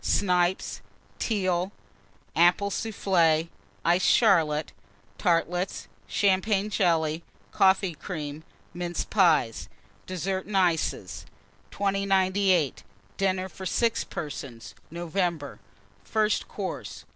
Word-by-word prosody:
Snipes. 180 -1 +1 0.4
Teal. 185 -4 0 0.6
Apple 175 +4 +4
Soufflé. 170 -7 +1 0.4
Iced 175 +2 +3
Charlotte. 160 - +3 0.5
Tartlets. 175 +2 0 0.2
Champagne 200 +1 +1
Jelly. 165 -5 +1 0.3
Coffee 190 -1 +3
Cream. 155 -3 -6 0.3
Mince 175 0 -3
Pies. 160 - +2 0.4
DESSERT 185 +1 -3
AND 205 -2 -1
ICES. 100 - 0 0.4
2098. 195 -5 +1 0.3
DINNER 190 -1 0
FOR 190 0 -7
6 230 +4 +1
PERSONS 135 -6 -7 0.2
(NOVEMBER). 170 -3 -2 0.4
FIRST 215 - 0
COURSE. - - -6
180 Hz, 85 wpm, -27 LUFS, 165-195 Hz, 0.6 s, Apple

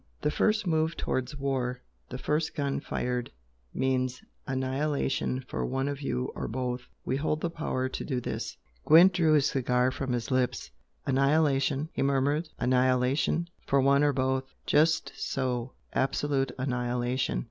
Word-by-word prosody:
The 150 - +2
first 215 +3 +2
move 160 -1 +1
towards 130 +3 -2
war 130 -2 -2 0.3
the 125 - -5
first 150 +4 -1
gun 140 -2 -1
fired 125 -1 -2 0.4
means 130 -1 -1 0.2
annihilation 135 0 -1
for - - -3
one 135 +1 -1
of 145 0 -3
you 125 -2 -2
or - - -4
both! 125 +1 -2 0.2
We 130 - 0
hold 155 +2 -1
the 170 - -1
power 130 -5 -2
to 130 - -5
do 130 -4 -1
this!'" - - -4 0.3
Gwent 170 +5 +7
drew 165 -4 +3
his 145 -3 +4
cigar 125 -1 +2
from 130 -1 -3
his 120 0 -2
lips. 125 - 0 0.3
"Annihilation!" 140 +1 +2
he - - -2
murmured 140 +4 +1
"Annihilation? 130 +5 +2 0.2
For 140 - +3
one 140 +2 +4
or 145 - +4
both!" 130 0 -1
"Just 160 +1 +3
so 125 -2 -2 0.2
absolute 135 -1 0
annihilation!" 125 0 -1
135 Hz, 145 wpm, -29 LUFS, 125-150 Hz, 0.4 s, Gwent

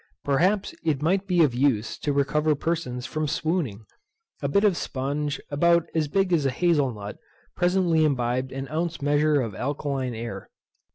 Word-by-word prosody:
Perhaps 185 +9 +1
it 155 -4 +1
might 190 +4 +1
be 175 -3 +4
of 140 -6 +2
use 120 -4 +1
to 145 - -1
recover 150 +2 +1
persons 145 -6 -3
from 155 +3 -2
swooning. 150 - -2 0.6
A - - 0
bit 200 +1 +2
of 205 -3 +5
spunge, 145 +1 -2
about 170 +3 +3
as 160 -2 +1
big 190 +3 +1
as 160 -4 +3
a 135 - +2
hazel 145 -1 +2
nut, 105 -2 -8 0.4
presently 175 -3 +2
imbibed 130 -2 0
an 135 +1 -5
ounce 165 +2 -2
measure 145 +1 +2
of 115 -4 -4
alkaline 135 0 -3
air. 110 -4 -6
145 Hz, 165 wpm, -25 LUFS, 130-170 Hz, 0.6 s, of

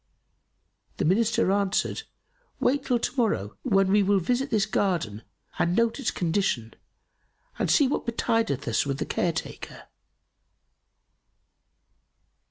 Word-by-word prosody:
The - - 0
Minister 215 +2 +2
answered, 200 0 0 0.6
"Wait 275 +2 +1
till 255 -3 +1
to 235 - -3
morrow 200 - 0
when 195 -5 +2
we 205 +1 +5
will 200 0 +3
visit 250 +9 -1
this 215 -2 +2
garden 170 - -1 0.4
and 175 +1 +1
note 230 +4 +1
its 275 - 0
condition 165 - -1 0.9
and - - 0
see 285 - +5
what 265 - -2
betideth 225 - 0
us 115 - +1
with 140 -1 -3
the - - -3
care 175 - 0
taker." 160 - -7
200 Hz, 125 wpm, -26 LUFS, 170-230 Hz, 0.9 s, we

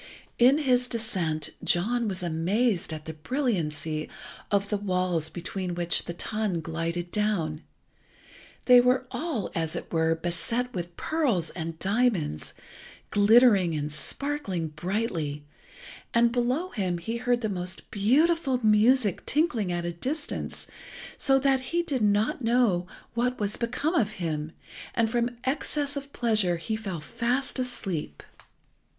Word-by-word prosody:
In 255 +4 +6
his 250 -4 +2
descent 175 -11 -1
John 230 +7 +2
was 185 -3 -3
amazed 175 +5 +1
at 155 -1 -6
the 160 - -5
brilliancy 160 - -2 0.4
of 200 0 +1
the 210 - +1
walls 180 -5 0
between 180 +1 -4
which 175 0 +2
the 170 - -4
tun 215 -3 -1
glided 165 +2 -3
down. 175 -8 0 1.0
They 250 -1 +8
were 250 +1 +2
all, 300 - -3
as 160 -2 -2
it - - -6
were, 160 0 +2
beset 180 +9 -2
with 175 -2 -5
pearls 245 - +1
and 165 -2 -5
diamonds, 195 - 0 0.6
glittering 205 -5 +5
and 150 0 -3
sparkling 190 - -3
brightly, 155 -3 -3 0.7
and 235 0 +5
below 255 +9 0
him 185 -5 -1
he 225 +7 -4
heard 245 0 +1
the 220 - 0
most 185 -2 -3
beautiful 270 +6 +2
music 215 0 +4
tinkling 245 - +1
at 175 0 -2
a 175 - -1
distance, 280 - -4 0.5
so 270 -1 +4
that 270 -1 +3
he 335 +7 -1
did 280 -7 -2
not 210 +8 +2
know 225 -7 +2 0.3
what 250 +2 0
was 205 -1 -1
become 250 +7 -1
of 215 - +1
him, 160 -5 -3 0.4
and 225 -1 +2
from 240 0 0
excess 285 +1 -1
of 280 0 -6
pleasure 215 -9 +2
he 165 +7 -3
fell 195 -7 -5
fast 245 - -1
asleep. 190 - -3
210 Hz, 135 wpm, -27 LUFS, 170-250 Hz, 1.0 s, They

